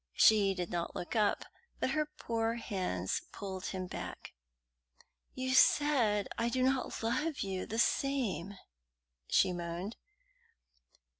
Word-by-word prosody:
She 200 -3 +5
did 180 -2 -3
not 170 -1 -2
look 175 - -5
up, 210 -2 +2 0.3
but 260 - 0
her 305 +1 +1
poor 230 -6 -2
hands 185 - -2
pulled 190 -2 -5
him 185 -1 -3
back. - - -7 1.0
"You 260 0 -1
said 250 -7 +4
I 230 +1 +1
do 255 +1 0
not 260 -3 0
love 295 +7 0
you 190 -2 -3
the 225 - -4
same!" 230 -8 0 0.7
she 185 - +3
moaned. 175 +4 -4
215 Hz, 125 wpm, -33 LUFS, 185-260 Hz, 1.0 s, She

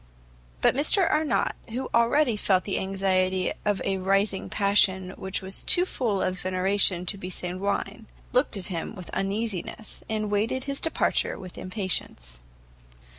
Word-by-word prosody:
But - - +4
Mr 315 +7 +2
Arnott, 305 -1 +1
who 255 +4 -3
already 235 +2 +3
felt 190 -3 +2
the 195 - -1
anxiety 190 -1 0
of 205 -2 0
a 195 -1 0
rising 195 +1 +1
passion 195 -2 +2
which 190 +1 -4
was 190 +1 -3
too 355 - +4
full 225 - -1
of 185 0 -1
veneration 185 0 +2
to 195 +3 -3
be 185 - -6
sanguine, 195 +4 -3 0.3
looked 250 -3 +2
at 190 - -3
him 175 +5 -4
with 180 -3 -9
uneasiness, 205 +1 -3
and 215 -1 -2
waited 220 +5 0
his 275 0 -1
departure 325 - +1
with 185 -2 -10
impatience. 185 - -3
195 Hz, 145 wpm, -26 LUFS, 185-225 Hz, 0.3 s, But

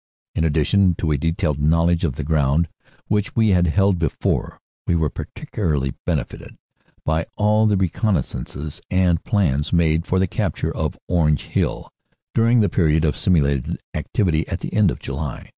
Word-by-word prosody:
u - - -3
ln - - +2
addition 85 +5 +2
to 80 -1 -1
a 75 - +2
detailed 80 -2 -1
knowledge 85 +3 +2
of 70 -7 0
the 75 - -4
ground, 75 +1 +2 0.4
which 105 0 -1
we 110 -2 +3
had 90 -2 +3
held 95 +2 +2
before, 80 -4 -1 0.3
we 85 - +2
were 80 -3 +1
particularly 75 -10 -3
benefited - - -3 0.5
by 80 +1 +1
all 105 +1 +3
the 105 -2 +2
reconnaissances 80 - -2
and 90 -3 +2
plans 75 -9 0
made 85 0 +2
for 95 - +1
the 95 - +3
capture 85 - -2
of - - -2
Orange 75 -5 +2
Hill - - -2 0.4
during 115 +1 +4
the 105 - +3
period 80 -4 +2
of 75 - +1
simulated 70 -8 +1
activity 80 -6 0
at - - -4
the - - -5
end 105 -4 +4
of - - -3
July. 70 -1 -6
85 Hz, 165 wpm, -21 LUFS, 75-95 Hz, 0.5 s, during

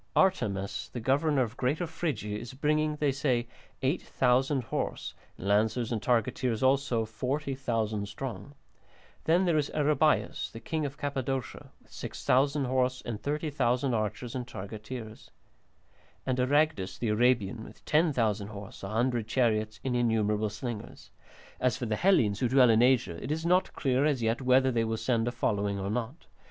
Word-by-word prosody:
Artamas 100 - +1
the 120 - -3
governor 140 +3 +2
of 115 0 -6
Greater 145 +7 0
Phrygia 150 -11 -3
is 120 +4 -7
bringing, 150 +2 +1
they 145 -2 +1
say, 130 -3 0 0.4
8000 130 -2 +1
horse, - - -3 0.2
and 95 - -6
lancers 110 +4 +2
and 110 -3 -1
targeteers 120 +1 0
also, 130 -4 +2
40,000 115 -3 -2
strong. 130 +3 -7 0.7
Then 175 +4 +4
there 165 -3 +3
is 145 - -1
Aribaius 150 0 +2
the 115 - -8
king 155 +6 -2
of 140 +1 -10
Cappadocia 135 -3 -3
with - - -27
6000 140 +2 0
horse 130 0 0
and 110 -3 -4
30,000 140 -4 0
archers 110 +2 -2
and 125 -2 -4
targeteers. 110 +3 -8 1.0
And 130 -1 0
Aragdus 140 -6 +1
the 115 - -1
Arabian 110 -1 +2
with - - -14
10,000 120 - +2
horse, 100 -1 -9
a 95 - -5
hundred 115 +1 0
chariots, 110 -3 +1
and 130 -2 0
innumerable 110 -3 +1
slingers. 105 +1 -7 0.5
As 125 -2 +1
for 125 - -3
the 110 -2 0
Hellenes 115 - +3
who 125 - +1
dwell 130 -2 +6
in 110 +1 +4
Asia, 120 -9 +2
it 130 - -4
is 160 +2 -2
not 180 +2 +2
clear 130 -1 +1
as 140 -6 +1
yet 115 +3 +1
whether 130 +1 +4
they 115 -2 +1
will 110 0 -1
send 115 -1 0
a - - 0
following 100 -4 -1
or 95 +1 -2
not. 125 +7 -4
125 Hz, 160 wpm, -29 LUFS, 110-140 Hz, 1.0 s, dwell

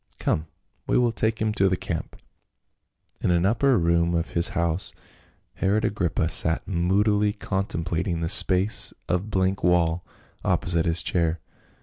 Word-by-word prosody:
Come, 80 +1 -1 0.4
we - - +2
will 120 -1 +2
take 110 0 +1
him 110 -1 0
to 100 -2 +2
the 95 - 0
camp." 80 -2 -5 1.0
In - - -1
an 85 0 +2
upper 120 +5 +2
room 85 0 +1
of 85 0 -2
his 85 +1 +2
house 85 +2 -1 0.6
Herod 105 +3 +1
Agrippa 85 -5 -1
sat 80 0 0
moodily 100 +3 +1
contemplating 90 -4 -3
the 80 - -1
space 95 +5 +4
of 90 +4 -2
blank 95 -1 -1
wall 85 -1 +2 0.4
oppo - - 0
site 85 -1 +1
his 80 -1 +2
chair. 85 -1 -1
90 Hz, 145 wpm, -24 LUFS, 85-100 Hz, 1.0 s, space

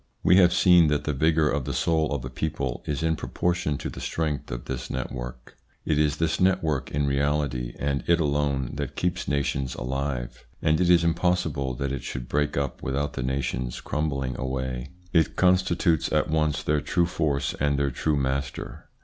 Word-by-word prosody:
We 90 - +6
have 90 -2 +6
seen 90 -2 +6
that 75 0 +1
the 75 - -1
vigour 80 +2 +3
of 70 -2 -1
the 70 -2 -3
soul 80 +3 +1
of 70 -4 -2
a - - -4
people 70 -3 -3
is 75 0 -2
in 80 0 +2
proportion 85 -2 -1
to - - -5
the - - -8
strength 75 -3 -2
of - - -5
this 65 0 -5
network. 60 0 -6 0.3
It 75 -2 +1
is 75 -1 +2
this 80 0 0
network 90 -7 +1
in 70 0 0
reality, 70 -3 0
and 70 0 -1
it 85 0 +4
alone, 70 -4 0
that 70 -1 -4
keeps 90 +1 -1
nations 70 -2 -1
alive, 65 -1 -3 0.2
and 80 +1 +2
it 90 - +3
is 85 -1 +6
impossible 85 -6 0
that 70 +1 -2
it 70 - -3
should 65 -1 -5
break 75 +2 0
up 70 -3 -2
without 70 +2 -2
the - - -4
nations 65 -1 -2
crumbling 70 -4 -2
away. 65 0 -3 0.2
It 80 -2 +3
consti 90 -1 +3
tutes 80 -3 +1
at - - +1
once 75 -2 +1
their 75 -1 +1
true 85 - +1
force 75 -5 -1
and 70 0 +1
their 70 -1 +1
true 75 +4 0
master. 65 0 -3
70 Hz, 190 wpm, -26 LUFS, 65-80 Hz, 0.3 s, We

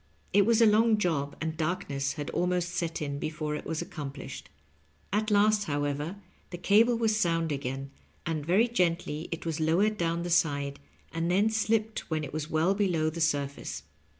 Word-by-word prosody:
It 200 +1 +5
was 230 0 +5
a - - +8
long 220 +1 +5
job, 150 -8 -1
and 160 0 -3
darkness 150 -4 -2
had 145 -1 -5
almost 180 -1 0
set 170 -3 -2
in 140 -1 -3
before 155 0 -3
it 150 - -5
was 160 +1 -2
accomplished. 135 - -7 0.6
At 215 +1 +1
last, 210 0 +4
however, 145 +2 -2 0.3
the 175 - -6
cable 220 +6 +4
was 225 -2 +2
sound 165 -5 +1
again, 135 -1 -4 0.3
and 160 -3 -2
very 190 +9 +3
gently 170 -7 0
it 165 - -5
was 165 -1 -2
lowered 190 +7 +2
down 170 0 0
the 175 - -3
side, 145 -4 +1 0.3
and 165 +1 -1
then 200 +5 +3
slipped 220 0 0
when 155 -1 -1
it 140 - -7
was 155 0 -3
well 160 +5 +2
below 175 -6 +1
the 170 +1 -5
sur 145 -3 +2
face. 140 - -7
165 Hz, 180 wpm, -29 LUFS, 150-205 Hz, 0.6 s, a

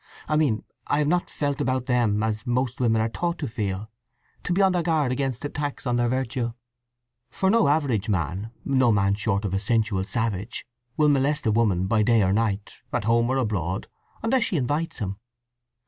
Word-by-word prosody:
I 150 - +1
mean 140 -8 +2 0.2
I - - +1
have 150 -1 +2
not 175 +3 +1
felt 145 -1 -2
about 130 -2 0
them 115 -5 +2
as 110 0 -2
most 125 0 0
women 115 -2 +3
are - - +1
taught 170 +8 -2
to 145 - -3
feel—to 110 - -6
be 180 - +2
on 195 -1 +5
their 180 -1 +1
guard 160 -6 +1
against 130 0 -2
attacks 145 -1 -4
on 120 -2 +1
their 120 0 +2
virtue; 125 -2 -1 0.8
for 190 0 +1
no 230 0 +4
average 135 -8 +1
man—no 110 - 0
man 100 -1 +3
short 100 0 0
of 95 - -2
a 95 - +1
sensual 105 -2 +1
savage—will 120 +6 -2
molest 145 +1 +1
a 110 - +3
woman 105 -5 +2
by 110 +2 +2
day 115 0 +4
or 95 0 +2
night, 105 -2 -1
at - - -1
home 115 +2 +2
or 130 - +1
abroad, 100 -7 -1 0.4
unless 245 +3 +2
she 185 - 0
invites 145 +5 -1
him. 100 -4 -3
120 Hz, 185 wpm, -25 LUFS, 105-140 Hz, 0.8 s, on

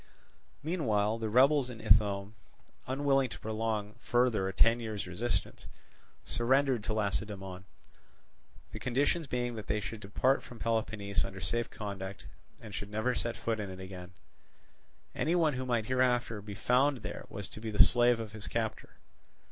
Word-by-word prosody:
Meanwhile 115 - +1
the 110 -1 -2
rebels 130 +3 +5
in 115 -3 -8
Ithome, 100 -1 +3 0.5
unable 135 0 +2
to - - -9
prolong 110 -1 -2
further 120 -5 +2
a - - -1
ten 115 +5 +4
years' 110 -3 -4
resistance, 95 +3 -2 0.6
surrendered 130 -1 +2
to 110 - -1
Lacedaemon; 100 -3 -2 1.1
the - - -6
conditions 145 +6 +1
being 120 -1 -1
that 110 -2 -7
they 105 - +1
should 110 +1 -6
depart 115 +7 +1
from 120 - -11
Peloponnese 110 -3 -1
under 95 - -6
safe 115 +6 -1
conduct, 100 -2 -6 0.3
and 110 -2 -10
should 100 - -5
never 110 +4 0
set 120 -1 -3
foot 115 -1 -1
in 100 -2 -4
it 95 0 -8
again: 95 -1 -9 1.0
any 165 +3 +1
one 160 -4 +3
who 130 0 -3
might 120 -3 +1
hereafter 125 -3 +1
be 100 0 -8
found 125 +5 +2
there - - -6
was 100 -2 -5
to 110 - -10
be 110 - -4
the 105 - +7
slave 120 -1 +4
of 110 -2 -5
his 105 -1 -7
captor. 110 -2 -3
110 Hz, 160 wpm, -31 LUFS, 105-125 Hz, 1.1 s, the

